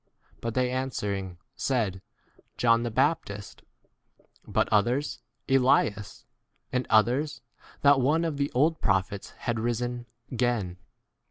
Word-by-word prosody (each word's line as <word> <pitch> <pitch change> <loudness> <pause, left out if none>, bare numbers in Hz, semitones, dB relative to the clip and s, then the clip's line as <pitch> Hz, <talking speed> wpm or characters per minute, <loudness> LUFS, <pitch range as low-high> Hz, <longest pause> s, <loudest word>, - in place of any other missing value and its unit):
But 115 -1 -4
they 125 -1 +1
answer 130 -6 -2
ing 95 -3 -5 0.2
said, 110 -8 -1 0.6
John 115 -1 +4
the 120 - -1
Baptist; 110 -4 -1 0.9
but - - +1
others, 120 +7 +1 0.3
Elias; 125 -6 +2 0.5
and 125 0 0
others, 125 +7 +2 0.4
that 140 -1 +6
one 155 +6 +2
of 155 -3 -2
the 140 0 -1
old 155 +5 +2
prophets 95 0 0
has 120 -2 -1
risen 120 +1 -2
20 - - -43 0.3
again. 115 -8 0
120 Hz, 120 wpm, -27 LUFS, 105-135 Hz, 0.9 s, that